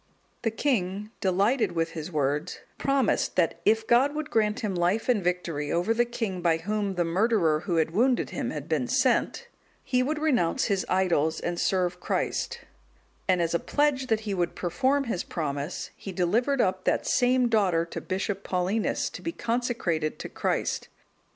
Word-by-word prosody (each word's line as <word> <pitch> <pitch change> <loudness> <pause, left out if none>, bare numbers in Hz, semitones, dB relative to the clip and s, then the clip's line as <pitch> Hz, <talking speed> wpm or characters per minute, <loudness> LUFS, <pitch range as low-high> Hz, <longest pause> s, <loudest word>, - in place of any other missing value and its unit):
The 225 - +1
king, 210 -4 -1
delighted 200 +3 +2
with 165 -1 -1
his 160 +1 -6
words, 150 +2 -1 0.2
promised, 275 -5 +1
that 170 -1 +1
if 220 +1 +3
God 265 +6 +3
would 305 0 -4
grant 215 +1 +1
him 210 -4 -1
life 180 +5 +1
and 235 -6 +2
victory 170 -5 -1
over 175 +6 +1
the 240 +1 +2
king 225 -6 -3
by 170 -2 +3
whom 200 +3 -2
the 175 -1 +1
murderer 175 -3 +2
who 175 +1 -2
had 160 -1 +2
wounded 245 +7 +2
him - - -3
had - - -5
been - - 0
sent, 485 - +1 0.4
he 250 -1 +1
would 295 +4 -1
renounce 265 - +1
his 195 -4 0
idols, 165 -4 +2
and 175 0 -3
serve 180 -1 0
Christ; - - -2 0.7
and 180 -2 +3
as 165 - -1
a 170 - +2
pledge 290 -3 +1
that 220 -2 +1
he 210 -2 -3
would 175 -2 -1
perform 265 +11 +1
his 225 -9 -2
promise, 145 0 -4
he 195 - -7
delivered 230 +10 +1
up 185 -2 0
that - - +1
same 250 0 +3
daughter 190 -7 +2
to 165 - -6
Bishop 195 +1 -3
Paulinus, 185 +4 0
to - - -8
be 335 - -3
consecrated 230 - -1
to - - -7
Christ. - - -1
195 Hz, 175 wpm, -27 LUFS, 175-240 Hz, 0.7 s, if